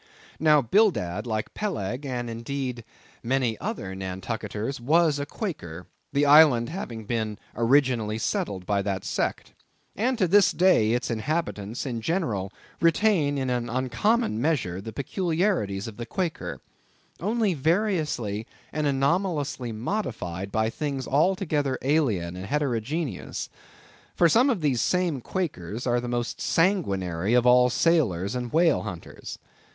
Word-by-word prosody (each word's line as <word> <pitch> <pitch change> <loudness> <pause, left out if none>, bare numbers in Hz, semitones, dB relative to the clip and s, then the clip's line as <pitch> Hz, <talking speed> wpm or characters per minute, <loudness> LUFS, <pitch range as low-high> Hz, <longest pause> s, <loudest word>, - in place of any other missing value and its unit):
Now, 150 -2 +5
Bildad, 120 - +2
like 110 -2 -3
Peleg, 125 - -3
and 120 -2 -3
indeed 120 +1 -4 0.4
many 125 -2 0
other 195 - -4
Nantucketers, 105 +6 -4
was 155 +3 +3
a 145 - -3
Quaker, 90 - -5 0.3
the 145 +1 +2
island 145 -5 +6
having 120 - -6
been 110 -2 -2 0.2
originally 120 -3 +2
settled 100 -4 -2
by 100 0 +1
that 100 -2 -3
sect; - - -2 0.4
and 245 +5 0
to 185 - +2
this 200 +1 +5
day 170 -12 +4
its 120 0 -1
inhabitants 115 -3 -2
in 120 -4 -3
general 115 - -1 0.3
retain 165 -4 +3
in 130 -2 -1
an 120 -1 -1
uncommon 130 - +1
measure 120 - 0
the 110 - -7
peculiarities 160 - -1
of 110 - -9
the 120 0 -6
Quaker, 175 +4 -3 0.6
only 210 +2 +1
variously 155 - 0 0.3
and 150 -1 0
anomalously 140 -2 0
modified 110 - -3
by 110 +1 +1
things 140 -3 -3
altogether 150 -3 +1
alien 115 - +1
and 95 +1 -6
heterogeneous. 135 - -2 0.7
For 170 - +5
some 240 - +4
of 225 -9 0
these 135 -6 +1
same 175 -7 +1
Quakers 120 - -4
are 120 -1 +2
the 120 - -5
most 120 -1 -3
sanguinary 100 - +1
of 125 0 +4
all 125 0 +6
sailors 115 - +2
and 125 -2 -3
whale 165 -1 +3
hunters. 85 -2 -8
130 Hz, 135 wpm, -26 LUFS, 110-165 Hz, 0.7 s, island